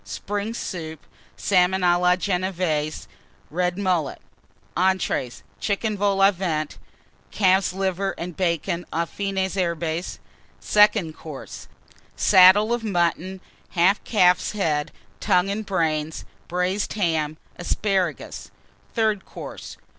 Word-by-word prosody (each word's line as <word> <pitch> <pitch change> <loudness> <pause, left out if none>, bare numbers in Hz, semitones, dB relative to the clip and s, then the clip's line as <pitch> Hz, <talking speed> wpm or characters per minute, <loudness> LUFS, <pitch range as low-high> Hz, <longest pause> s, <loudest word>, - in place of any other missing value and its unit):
Spring 205 +2 -4
Soup. 160 -8 -5 0.4
Salmon 185 -1 +2
à 175 -1 +4
la 180 0 +4
Genévése. 180 -5 -1 0.5
Red 180 +2 0
Mullet. 180 -7 0 0.6
ENTREES. 185 -9 0 0.2
Chicken 215 +1 -1
Vol 200 -1 +1
au 195 - +7
Vent. 165 -5 -3 0.5
Calf's 190 -2 +3
Liver 195 +1 -1
and 175 0 -6
Bacon 175 0 -1
aux 170 +1 0
Fines 190 +1 -2
Herbes. 170 -2 -2 0.4
SECOND 210 -6 +3
COURSE. 150 -4 -9 0.5
Saddle 190 - +6
of 240 -1 -2
Mutton. 185 -1 -1 0.4
Half 185 +5 +4
Calf's 180 -4 +3
Head, 155 -8 0 0.3
Tongue, 180 +2 +2
and 210 0 -4
Brains. 160 -4 -1 0.2
Braised 180 +3 -1
Ham. 160 -6 0 0.2
Asparagus. 185 -1 -1 0.5
THIRD 215 -4 +1
COURSE. - - -9
185 Hz, 110 wpm, -23 LUFS, 170-195 Hz, 0.6 s, au